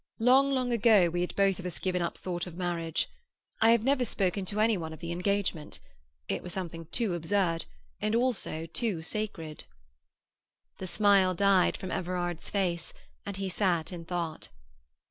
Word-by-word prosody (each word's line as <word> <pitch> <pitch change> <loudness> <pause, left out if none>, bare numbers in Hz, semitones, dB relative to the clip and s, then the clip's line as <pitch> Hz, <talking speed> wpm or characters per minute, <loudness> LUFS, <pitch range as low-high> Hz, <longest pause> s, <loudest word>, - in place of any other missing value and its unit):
Long, 260 +4 +5
long 255 -2 0
ago 210 -6 +5
we 175 +1 -1
had 180 - -3
both 195 -1 +2
of 185 - -7
us 175 - -1
given 180 -1 -1
up 170 - -2
thought 175 -1 -4
of 175 -1 -9
marriage. 170 -3 -1 0.5
I 225 - +6
have 230 -1 +5
never 270 0 +2
spoken 195 -4 0
to 205 +3 -2
any 220 0 +4
one 160 -3 -5
of 160 - -10
the 170 0 -5
engagement; 180 -3 -1 0.5
it - - -2
was 180 - -3
something 165 -3 -5
too 220 0 -1
absurd, 170 0 0 0.4
and 215 +2 +1
also 230 -10 0
too 175 0 -2
sacred." 165 - -3 1.1
The 185 - -4
smile 195 -2 +4
died 195 -1 +3
from 185 -1 -6
Everard's 175 -2 -2
face, 175 -4 -1 0.3
and 200 -1 -4
he 195 0 -2
sat 180 -3 0
in 170 -1 -6
thought. 170 -2 -4
185 Hz, 170 wpm, -29 LUFS, 170-205 Hz, 1.1 s, I